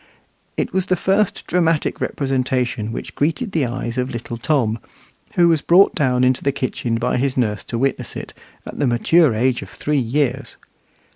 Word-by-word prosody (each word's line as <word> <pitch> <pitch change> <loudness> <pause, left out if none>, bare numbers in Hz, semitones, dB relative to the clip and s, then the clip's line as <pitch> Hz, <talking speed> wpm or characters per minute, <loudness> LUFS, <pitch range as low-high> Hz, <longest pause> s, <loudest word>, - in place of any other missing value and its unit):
It - - -2
was 190 -1 0
the 185 - +2
first 195 +3 0
dramatic 165 -3 +1
representation 130 -5 -1
which - - -6
greeted 165 - -1
the 150 -8 +1
eyes 120 0 -3
of 125 +1 -1
little 120 0 -5
Tom, 120 -4 0 0.6
who 175 -1 +5
was 165 -3 +3
brought 180 +5 +5
down 130 -4 +1
into 130 0 +2
the 140 - +2
kitchen 125 -3 -2
by 125 +2 0
his 130 +1 0
nurse 105 -5 0
to 120 - -4
witness 135 +2 -1
it, - - -7 0.3
at - - -8
the 140 - +2
mature 130 +3 +3
age 125 +2 +1
of - - -9
three 150 -1 -1
years. 135 +2 -1
130 Hz, 180 wpm, -20 LUFS, 120-155 Hz, 0.6 s, who